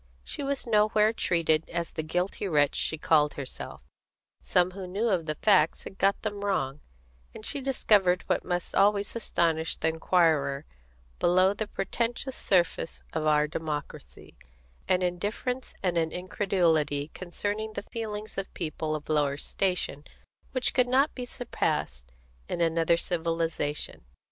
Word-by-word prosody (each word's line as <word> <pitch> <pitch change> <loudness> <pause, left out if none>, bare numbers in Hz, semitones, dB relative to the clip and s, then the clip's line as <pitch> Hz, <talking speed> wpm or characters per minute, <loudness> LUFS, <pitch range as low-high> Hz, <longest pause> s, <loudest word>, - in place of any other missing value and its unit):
She - - -4
was 280 -1 -2
nowhere 215 -1 +3
treated 165 -6 +1
as 170 0 -2
the 160 - -3
guilty 180 +5 -2
wretch 145 -5 +3
she 160 - -1
called 150 -1 +3
herself; 135 -3 -7 0.6
some 180 0 +2
who 190 0 -7
knew 205 +6 0
of 175 -5 0
the 155 - -1
facts 185 -3 +3
had 190 - -10
got 195 +1 +2
them 205 -2 -3
wrong; 150 -9 -1 0.6
and 215 - -8
she 285 - 0
discovered 205 -9 +3
what - - 0
must 175 -1 -3
always 200 +1 +3
astonish 165 -7 0
the 160 - +1
inquirer 160 -4 +2 0.5
below 185 +2 +4
the 210 +1 -3
pretentious 235 +7 -2
surface 175 -3 0
of 155 -1 -1
our 150 0 +4
democracy 150 -1 -6 0.5
an 185 0 +2
indifference 205 +8 -2
and 175 -2 +2
an 160 -1 0
incredulity 170 -6 +1
concerning 205 +4 -3
the - - -4
feelings 215 -3 -4
of 195 - -5
people 155 -2 -2
of 150 - -7
lower 145 -2 +1
station 180 -4 -1 0.5
which 255 -1 0
could 250 -1 +3
not 270 +4 +3
be 250 - -5
surpassed 60 - -2 0.4
in - - -2
another 165 0 +3
civilisation. 165 - -1
180 Hz, 145 wpm, -28 LUFS, 160-210 Hz, 0.6 s, below